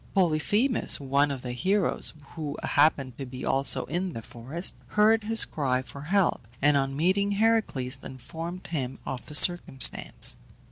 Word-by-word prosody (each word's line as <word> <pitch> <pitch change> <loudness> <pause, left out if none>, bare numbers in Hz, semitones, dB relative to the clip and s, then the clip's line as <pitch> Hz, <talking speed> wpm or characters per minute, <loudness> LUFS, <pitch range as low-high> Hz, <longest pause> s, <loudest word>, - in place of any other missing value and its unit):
Polyphemus, 195 - +2
one 140 +1 +1
of 135 -3 -6
the 125 - -5
heroes, 185 +11 0 0.2
who 150 -3 -6
happened 140 -4 +1
to 135 - -5
be 130 0 -8
also 135 +1 +2
in 180 0 -3
the 115 - -7
forest, 135 - -4
heard 215 +1 +2
his 225 +1 +6
cry 130 -4 -2
for 140 +2 -11
help, 175 - 0
and 145 +1 +3
on 135 0 -1
meeting 195 +5 +1
Heracles 200 - 0
informed 165 +7 -8
him 135 -6 -4
of 130 -2 -6
the 150 - -8
circumstance. 175 -5 +2
150 Hz, 150 wpm, -26 LUFS, 135-190 Hz, 0.2 s, his